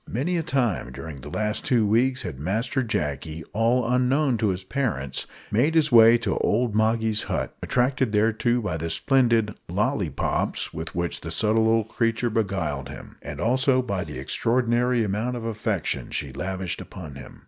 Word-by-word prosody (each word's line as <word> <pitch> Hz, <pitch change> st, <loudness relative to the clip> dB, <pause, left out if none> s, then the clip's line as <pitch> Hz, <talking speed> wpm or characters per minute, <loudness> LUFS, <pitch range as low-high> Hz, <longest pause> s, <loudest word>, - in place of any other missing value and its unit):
Many 145 Hz, +10 st, -1 dB
a -, -, +1 dB
time 125 Hz, -, -1 dB
during 70 Hz, +1 st, -8 dB
the -, -, -8 dB
last 105 Hz, 0 st, -2 dB
two 120 Hz, -4 st, +2 dB
weeks 125 Hz, +5 st, +2 dB
had 80 Hz, -8 st, -6 dB
Master 110 Hz, -, -1 dB
Jacky, 80 Hz, -, -3 dB
all 115 Hz, +2 st, +2 dB
unknown 125 Hz, +2 st, +2 dB
to 110 Hz, -, +2 dB
his 95 Hz, -1 st, -1 dB
parents, 95 Hz, -, -2 dB, 0.2 s
made 135 Hz, +10 st, +2 dB
his 155 Hz, -2 st, +4 dB
way 115 Hz, 0 st, +8 dB
to 115 Hz, -4 st, -1 dB
old 115 Hz, +1 st, +1 dB
Moggy's 110 Hz, 0 st, +2 dB
hut -, -, -3 dB
attracted 130 Hz, -1 st, +1 dB
thereto 110 Hz, +3 st, +2 dB
by 90 Hz, -6 st, -2 dB
the 80 Hz, +1 st, -3 dB
splendid 115 Hz, -, +2 dB, 0.2 s
"lollipops" 100 Hz, -, -1 dB
with 80 Hz, +1 st, -6 dB
which 85 Hz, 0 st, -2 dB
the 80 Hz, -, -6 dB
subtle 110 Hz, +6 st, +2 dB
old 115 Hz, -1 st, +2 dB
creature 115 Hz, +1 st, 0 dB
beguiled 85 Hz, -, -1 dB
him, -, -, -10 dB
and 75 Hz, +1 st, -7 dB
also 130 Hz, -, +2 dB
by 100 Hz, -6 st, -2 dB
the -, -, -7 dB
extraordinary 120 Hz, 0 st, +1 dB
amount 110 Hz, +5 st, -1 dB
of 115 Hz, -2 st, -5 dB
affection 105 Hz, -5 st, -2 dB
she 70 Hz, -3 st, -4 dB
lavished 95 Hz, +4 st, -3 dB
upon 80 Hz, -7 st, -9 dB
him. 65 Hz, -2 st, -11 dB
110 Hz, 170 wpm, -25 LUFS, 90-125 Hz, 0.2 s, way